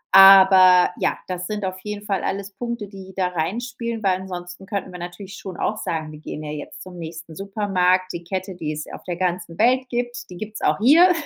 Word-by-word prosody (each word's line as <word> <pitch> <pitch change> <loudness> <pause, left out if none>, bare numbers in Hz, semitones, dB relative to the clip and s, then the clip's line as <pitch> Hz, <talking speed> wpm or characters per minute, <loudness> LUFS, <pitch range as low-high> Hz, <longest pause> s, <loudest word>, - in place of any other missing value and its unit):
Aber, 190 -2 +8
ja, - - +1
das 180 -1 -4
sind 210 -2 -3
auf 185 0 -4
jeden 210 +1 -6
Fall 195 -2 -1
alles 200 +1 -3
Punkte, 235 0 -4
die 190 -1 -11
da 185 -2 +1
reinspielen, 230 +7 -3
weil 185 -1 +2
ansonsten 180 0 -8
könnten 200 -3 -3
wir 180 - -8
natürlich 190 +3 -8
schon 185 -3 -7
auch 215 - -1
sagen: 160 -6 -3
„Wir 150 - -11
gehen 155 0 -7
ja 150 - -5
jetzt 150 -1 -7
zum 185 -1 -11
nächsten 165 0 -8
Supermarkt, 190 -2 +1
die 170 0 -6
Kette, 190 +2 -4
die 155 -3 -3
es 150 0 -5
auf - - -9
der 180 - -3
ganzen 175 -1 -2
Welt 255 +3 +3
gibt, 240 0 -3
die 180 - -9
gibt's 215 +1 -7
auch - - +2
hier”, 320 - +7
190 Hz, 215 wpm, -22 LUFS, 180-210 Hz, -, Aber